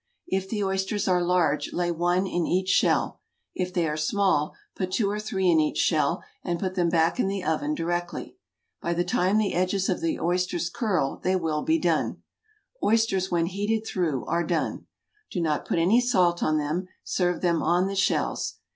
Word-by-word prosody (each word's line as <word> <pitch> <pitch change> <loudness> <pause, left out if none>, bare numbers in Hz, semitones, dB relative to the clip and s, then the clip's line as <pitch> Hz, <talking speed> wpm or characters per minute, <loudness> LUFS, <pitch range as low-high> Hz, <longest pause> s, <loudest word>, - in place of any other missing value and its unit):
If 190 0 -2
the 210 -1 -1
oysters 195 +2 -1
are 180 -1 +3
large 175 -4 +1
lay 175 0 0
one 175 +3 +1
in 175 -3 -1
each 185 +1 0
shell, - - +2 0.3
if 185 -1 -2
they 175 -2 0
are 150 - -1
small 155 -1 +1 0.2
put 185 -1 -3
two 200 -2 +1
or 210 - -2
three 195 -3 -1
in 165 -2 +5
each 155 -1 0
shell 165 +2 +1 0.2
and 175 -2 -2
put 185 0 -2
them 175 -2 +1
back 165 +6 +2
in 220 - +2
the 195 -1 -2
oven 155 -2 0
directly. 175 +1 -3 0.5
By 170 0 -1
the 175 - +1
time 180 +3 +1
the 215 -2 +1
edges 185 +2 0
of 185 - 0
the 165 - -1
oysters 175 0 0
curl 185 - 0
they 185 +1 0
will 160 -4 -1
be 320 - +2
done. - - 0 0.6
Oysters 205 -4 +2
when 170 -1 +1
heated 205 +5 -1
through 165 - -1
are 170 - 0
done. 165 -1 -2 0.4
Do - - -3
not 155 -3 0
put - - 0
any 190 +9 +4
salt 180 -8 +2
on 155 0 +2
them. 155 +5 -2 0.2
Serve 180 -2 0
them 170 -2 +2
on 175 +3 +2
the 195 +1 -3
shells. 195 - 0
180 Hz, 190 wpm, -26 LUFS, 170-195 Hz, 0.6 s, in